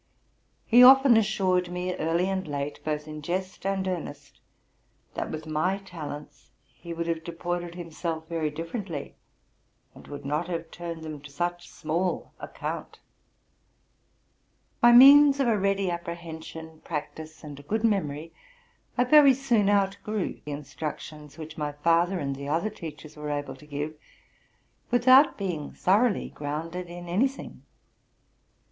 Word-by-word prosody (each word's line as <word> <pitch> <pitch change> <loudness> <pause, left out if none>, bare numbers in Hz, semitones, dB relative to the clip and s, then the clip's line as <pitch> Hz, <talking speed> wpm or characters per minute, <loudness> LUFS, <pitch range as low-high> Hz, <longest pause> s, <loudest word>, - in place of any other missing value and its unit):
He 245 +1 +6
often 265 -1 +8
assured 190 -5 +2
me, 180 +1 -2
early 165 +3 0
and 190 -2 -2
late, 145 0 -4
both 150 -1 -3
in 155 0 -7
jest 185 +4 -3
and 195 -1 -1
earnest, 145 -6 -6 0.7
that - - -3
with 155 0 -6
my 155 +5 0
talents 150 -7 -9 0.2
he 170 - -10
would 170 0 -3
have 165 -1 -2
deported 175 +1 -4
himself 165 -1 -5
very 165 -2 -1
differ 165 +9 -5
ently, 165 -8 -6 0.8
and - - -15
would 145 -1 -8
not, 150 +4 -1
have 165 -2 -4
turned 170 -2 -7
them 155 -2 -7
to 150 - -11
such 175 +4 -3
small 170 +4 -2
account - - -6 1.8
By 240 - +7
means 280 +3 +9
of 270 - +2
a 230 - +3
ready 195 -2 +1
apprehension, 160 -2 -7
practice, 155 0 -6
and 145 -2 -9
a - - -10
good 215 +10 -2
memory, 165 -7 -1 0.6
I 245 - +4
very 280 +1 +7
soon 240 -7 +2
outgrew 200 +1 -1
the 150 - -6
instructions 150 +1 -7
which 160 0 -8
my 150 -1 -2
father 170 +5 +2
and 140 -4 -3
the 140 +1 -7
other 165 +9 0
teachers 160 -5 -9
were 150 -1 -6
able 145 -2 -3
to 150 +3 -16
give, 145 +1 -4 1.0
without 255 +4 +6
being 175 -7 -3
thoroughly 205 +3 +2
grounded 165 +5 -5
in 175 0 -9
any 195 +10 +3
thing. 270 +1 -10
170 Hz, 145 wpm, -27 LUFS, 155-195 Hz, 1.8 s, means